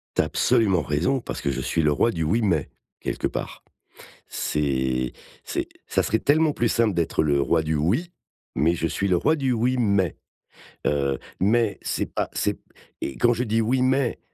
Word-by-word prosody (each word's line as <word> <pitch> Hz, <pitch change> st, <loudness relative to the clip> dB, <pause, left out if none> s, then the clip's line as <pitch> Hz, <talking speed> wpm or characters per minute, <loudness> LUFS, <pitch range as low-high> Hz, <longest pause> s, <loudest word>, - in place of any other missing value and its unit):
Tu -, -, +4 dB
as -, -, -1 dB
absolument 95 Hz, -7 st, +2 dB
raison 75 Hz, -, 0 dB
parce -, -, -6 dB
que 70 Hz, -, -1 dB
je 65 Hz, -, -2 dB
suis 80 Hz, -, 0 dB
le 75 Hz, -1 st, +3 dB
roi 115 Hz, +10 st, +2 dB
du 80 Hz, -, -2 dB
«Oui, 95 Hz, +10 st, +1 dB
mais» 85 Hz, -9 st, +1 dB, 0.3 s
quelque -, -, -2 dB
part. -, -, -5 dB, 0.6 s
C'est 65 Hz, -4 st, -1 dB, 0.3 s
c'est -, -, -3 dB, 0.2 s
ça -, -, +1 dB
serait 110 Hz, -, +1 dB
tellement 155 Hz, +1 st, +3 dB
plus 120 Hz, -, +1 dB
simple 115 Hz, -2 st, +2 dB
d'être 85 Hz, -2 st, +1 dB
le 70 Hz, -2 st, +2 dB
roi 80 Hz, +2 st, +2 dB
du 80 Hz, 0 st, -1 dB
«Oui», 105 Hz, -, 0 dB, 0.4 s
mais 85 Hz, +3 st, +2 dB
je 80 Hz, -, -1 dB
suis 95 Hz, +4 st, -1 dB
le 90 Hz, -, +3 dB
roi 155 Hz, -, +2 dB
du 135 Hz, -4 st, 0 dB
«Oui, 125 Hz, +3 st, +1 dB
mais», 100 Hz, -7 st, +1 dB, 0.7 s
heu, 70 Hz, -2 st, 0 dB, 0.2 s
mais 110 Hz, +2 st, +2 dB
c'est -, -, -1 dB
pas -, -, -3 dB
c'est -, -, -1 dB, 0.4 s
et 70 Hz, -, -4 dB
quand 120 Hz, 0 st, +4 dB
je 120 Hz, +1 st, -1 dB
dis: 115 Hz, -1 st, +1 dB
«Oui, 125 Hz, +4 st, +1 dB
mais», 130 Hz, -1 st, +1 dB
95 Hz, 195 wpm, -24 LUFS, 75-120 Hz, 0.7 s, Tu